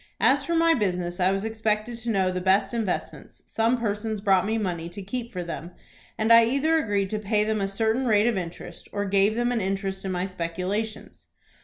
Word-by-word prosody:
As - - +3
from 335 -1 0
my 330 0 +5
business 180 - -1
I 180 0 +3
was 195 +2 -1
expected 220 +1 -1
to 235 0 -5
know 190 -4 +2
the 185 0 -3
best 195 +2 +2
investments, 220 -6 -4
some 230 +3 +1
persons 215 -1 -2
brought 195 -2 +3
me 220 +1 0
money 175 -5 -3
to 180 +4 -8
keep 235 +4 -5
for 180 -2 -4
them, 170 +1 -7 0.4
and 220 +1 +4
I 230 0 +8
either 280 +7 +2
agreed 200 -8 -1
to 215 - -1
pay 210 0 +1
them 215 -1 -1
a 195 - 0
certain 225 +5 0
rate 210 -1 +4
of 240 -1 +2
interest, 175 -1 -7
or 205 0 -2
gave 200 +2 +2
them 240 +1 +1
an 235 -2 0
interest 195 0 -2
in 190 - -3
my 180 0 -1
speculations. 185 +4 -4
205 Hz, 210 wpm, -25 LUFS, 190-225 Hz, 0.4 s, I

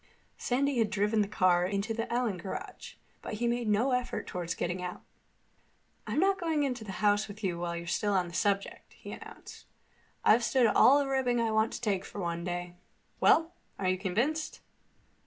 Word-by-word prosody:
Sandy 270 +1 0
had 220 -2 +2
driven 210 +1 +1
the 205 - 0
car 180 -3 +3
into 200 +4 -1
the 230 +1 -4
Allen 235 -5 0
garage, 190 +3 -7 0.3
but - - -6
he 235 +3 -2
made 240 -1 -1
no 225 +6 +2
effort 250 0 -1
toward 175 -2 -4
getting 175 +1 -2
out. 180 0 -6 1.0
"I'm - - -2
not 385 +2 +3
going 320 -4 0
into 250 -4 -2
the 200 -3 -7
house 205 +1 +3
with 210 +1 -11
you 175 -3 -1
while 170 0 -3
you're 170 - -6
still 205 +4 0
on 185 -2 +1
this 170 +1 -2
subject," 200 -2 -1
he - - -10
announced. - - -11 0.6
"I've 235 +3 +5
stood 255 0 +3
all 255 +4 +6
the 285 -1 +1
ribbing 260 -3 +1
I 230 -1 +1
want 220 +1 +2
to - - -6
take 200 -5 0
for 205 - -8
one 170 -2 -3
day. 175 0 -4 0.4
Well? 330 +1 +4 0.2
Are 185 -2 0
you 185 - +1
convinced?" 245 - -1
210 Hz, 195 wpm, -30 LUFS, 185-245 Hz, 1.0 s, all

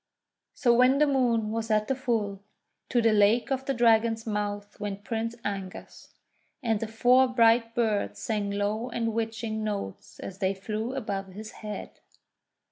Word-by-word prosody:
So 240 -3 +3
when 255 +3 +5
the 300 - +5
Moon 240 -6 +1
was 225 0 -3
at 215 -1 +2
the - - +1
full, 225 -7 -2 0.5
to 240 -2 +2
the 225 -1 +4
Lake 215 +5 +3
of 265 0 -1
the 275 - +1
Dragon's 225 -1 +3
Mouth 205 -1 -3
went 205 -1 -5
Prince 230 +1 -3
Angus; 195 -2 -6 0.5
and 225 -3 +1
the 225 - -3
four 245 +4 +4
bright 230 -1 +3
birds 220 -4 0
sang 210 -3 -2
low 205 +4 -1
and 230 -1 -2
watching 225 -1 -3
notes 100 - -5
as 195 0 -8
they 195 -1 0
flew 215 +6 -4
above 200 -6 -3
his 215 +2 -8
head. 210 -1 -8
225 Hz, 160 wpm, -27 LUFS, 205-235 Hz, 0.5 s, when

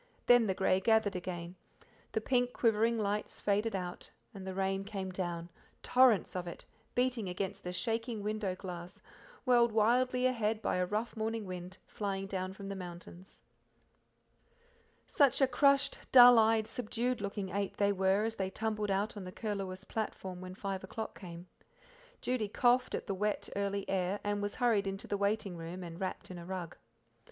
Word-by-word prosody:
Then 245 -2 +6
the 190 - 0
grey 190 -1 +3
gathered 220 -1 +3
again, 175 -1 -5 0.5
the 220 - -1
pink, 245 +1 +1
quivering 230 0 +2
lights 210 -1 -1
faded 210 +1 +1
out, 180 -2 -5 0.2
and 190 -2 -8
the 190 - -4
rain 195 0 0
came 195 -2 -5
down 175 -2 -4 0.3
torrents 250 -7 +4
of 180 -1 -3
it, 170 - -8 0.3
beating 245 -5 +1
against 185 +1 -4
the 180 - -4
shaking 225 +2 -2
window 210 -3 -1
glass, 180 -2 -8 0.4
whirled 240 -2 +5
wildly 250 +4 +3
ahead 225 -4 +1
by 220 - 0
a 180 0 +1
rough 215 +4 -2
morning 220 0 -2
wind, 180 0 -7
flying 195 -2 -3
down 185 -1 -3
from 195 +1 -9
the 200 - -4
mountains. 180 0 -10 1.6
Such 280 -4 +3
a 270 - +6
crushed, 275 +2 +3
dull 245 -2 +10
eyed, 220 0 +4
subdued 240 +1 -2
looking 200 -1 -3
eight 200 +1 -2
they 200 0 +3
were 190 +1 +2
as 225 0 -1
they 190 -3 -2
tumbled 215 0 -2
out 200 +3 0
on 205 - -6
the 180 - -7
Curlewis 195 -3 -4
platform 190 -4 -4
when 185 0 -7
five 195 -1 -4
o'clock 220 +3 -6
came. 175 -2 -9 0.8
Judy 245 -4 0
coughed 245 +3 +3
at - - -4
the 200 - -2
wet, 210 +2 -1
early, 200 0 -1
air, 190 +1 0
and 205 0 -1
was 205 0 -3
hurried 225 -5 +2
into 195 +1 -4
the - - -2
waiting 200 -2 0
room 170 +3 -6
and 170 0 -8
wrapped 190 0 -4
in 180 - -7
a 170 - -9
rug. 180 -3 -5
200 Hz, 175 wpm, -33 LUFS, 185-225 Hz, 1.6 s, dull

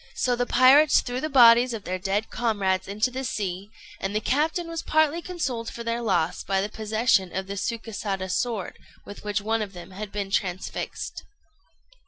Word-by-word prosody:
So 250 -1 +1
the 245 0 -1
pirates 275 +4 +6
threw 245 0 -4
the 310 - -2
bodies 240 -2 +6
of 215 - -7
their 185 0 -3
dead 200 +3 -1
comrades 195 -5 0
into 210 +5 0
the 260 +1 -4
sea, 200 -4 -3 0.3
and 195 +2 -3
the - - +3
captain 315 - 0
was 330 -1 -4
partly 315 +1 +2
consoled 260 -11 -3
for 235 - -7
their 230 +1 -2
loss 180 -7 0
by 195 0 0
the 200 +2 -1
possession 215 -3 +1
of 190 0 -2
the 200 - -5
Sukésada 200 -3 -3
sword 220 -3 -2 0.3
with 205 - -10
which 205 0 -1
one 225 +2 0
of 200 -2 -5
them 175 +1 -10
had 200 +1 -7
been 200 -1 -4
transfixed. 185 -2 -3
215 Hz, 185 wpm, -25 LUFS, 195-245 Hz, 0.3 s, pirates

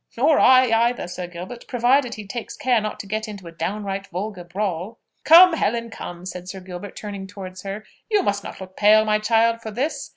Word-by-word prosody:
"Nor 290 +5 +4
I, 255 -2 +6 0.2
either, 245 -7 -5
Sir 180 0 -6
Gilbert, 180 +7 -9
provided 245 0 +2
he 215 - -8
takes 225 +3 -6
care 245 -3 +2
not 215 0 -4
to - - -13
get 215 +2 -3
into 200 -4 -9
a 170 - -8
downright 195 +2 -4
vulgar 185 +1 -5
brawl." 190 +3 -4 0.3
"Come, 355 +3 +9
come, 325 - -1
Helen," 225 -6 -3
said 180 -1 -7
Sir 190 - -6
Gilbert, 185 +1 -9
turning 200 -2 -7
towards 190 -2 -9
her, 200 +2 -6 0.2
"you 420 -3 +2
must 200 0 -1
not - - -8
look 190 0 -10
pale, 215 +1 +5
my 215 0 +2
child, 230 +1 +2
for 220 - -6
this. 275 +6 -3
210 Hz, 205 wpm, -22 LUFS, 190-235 Hz, 0.3 s, Come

